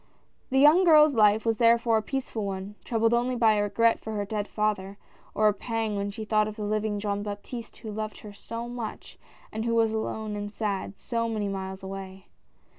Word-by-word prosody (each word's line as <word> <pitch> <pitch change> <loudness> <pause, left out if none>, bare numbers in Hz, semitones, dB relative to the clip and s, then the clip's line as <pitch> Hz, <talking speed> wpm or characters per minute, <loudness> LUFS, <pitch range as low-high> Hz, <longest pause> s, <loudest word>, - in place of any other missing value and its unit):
The 265 - +1
young 300 +7 +7
girl's 305 -4 +7
life 215 -1 +4
was 225 -1 +1
therefore 230 -1 +4
a - - +1
peaceful 245 -2 -4
one, 195 0 -4
troubled 225 0 +1
only 245 +2 +1
by 225 -2 +4
a 210 - +1
regret 225 +3 +2
for 220 - -6
her 205 -1 -1
dead 210 0 -3
father, 200 -2 -2 0.4
or 215 - +4
a 210 - +4
pang 225 0 -2
when 200 0 -2
she 215 +2 -6
thought 215 0 +2
of 215 - -6
the 215 - -5
living 210 0 -1
Jean 205 -1 -2
Baptiste 205 +3 -7
who 220 - -7
loved 215 0 -5
her 210 -1 -10
so 230 +3 -6
much, 240 -3 -7 0.3
and 220 +1 -3
who 230 0 0
was 225 -1 +3
alone 220 -1 -3
and 205 0 -5
sad, 200 -2 -3
so 230 -1 -2
many 215 -2 -2
miles 190 -1 -5
away. 190 0 -8
215 Hz, 205 wpm, -27 LUFS, 205-230 Hz, 0.4 s, young